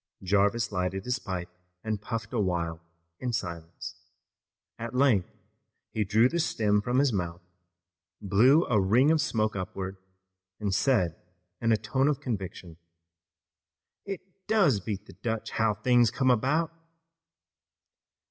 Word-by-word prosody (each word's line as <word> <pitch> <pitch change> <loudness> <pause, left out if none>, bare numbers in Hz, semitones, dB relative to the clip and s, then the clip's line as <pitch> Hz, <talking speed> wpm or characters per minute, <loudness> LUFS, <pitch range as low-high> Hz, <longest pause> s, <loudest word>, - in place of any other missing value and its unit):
Jarvis 100 +4 +2
lighted 95 0 -2
his 125 +1 -1
pipe 90 -5 -4 0.4
and 110 -2 -2
puffed 115 +1 -5
a 120 - 0
while 85 -4 -1 0.4
in 125 -1 -2
silence. 85 -4 -5 0.8
At 115 +2 -5
length 125 -9 +3 0.6
he 110 - 0
drew 110 +4 +4
the 170 +6 -2
stem 105 -9 +2
from 120 +4 0
his 135 -3 +3
mouth, 85 -2 -3 0.8
blew 120 - +4
a 110 -4 +2
ring 120 +10 +4
of 160 -1 +3
smoke 110 -8 0
upward 95 0 -4 0.6
and 100 -3 -1
said 95 - +1 0.4
in 115 -1 +2
a 110 - +4
tone 130 +6 0
of 150 -3 +1
conviction: 95 -7 -5 1.3
"It 195 -2 -5 0.3
does 195 - +4
beat 100 +1 -5
the - - -13
Dutch 110 +4 -3
how 110 -2 +1
things 120 +2 +4
come 130 +2 +2
about!" 135 +8 +1
110 Hz, 135 wpm, -28 LUFS, 95-125 Hz, 1.3 s, drew